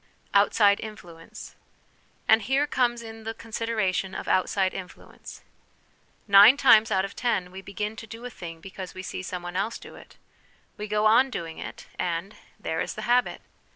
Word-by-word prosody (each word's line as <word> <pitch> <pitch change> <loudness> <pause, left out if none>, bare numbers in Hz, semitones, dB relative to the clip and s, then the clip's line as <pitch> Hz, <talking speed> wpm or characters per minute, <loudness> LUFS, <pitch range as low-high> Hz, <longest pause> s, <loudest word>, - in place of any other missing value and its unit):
Outside 200 0 +4
Influence. 175 -7 -10 0.7
And 220 +1 +6
here 265 +7 +1
comes 240 -4 0
in 225 0 -10
the 225 0 -5
consideration 220 -5 -2
of - - -6
outside 190 0 +1
influence. 185 -1 -10 0.8
Nine 205 +6 +8
times 225 -5 +6
out 190 0 +1
of 195 - -9
ten 190 -7 -1
we 190 +1 -9
begin 210 +2 -5
to 225 - -9
do 230 +3 -9
a 250 - -6
thing 165 -5 -9
because 190 0 -9
we 185 - -7
see 185 - -5
some 180 -1 -6
one 175 0 -7
else 205 +5 -1
do - - -13
it; - - -15 0.6
we 210 - -6
go 210 +1 0
on 230 +5 +5
doing 165 -9 -6
it, - - -8
and 175 +4 -3 0.2
there 160 - -2
is - - -4
the 215 - -6
habit 245 +3 +1
210 Hz, 175 wpm, -26 LUFS, 185-225 Hz, 0.8 s, Nine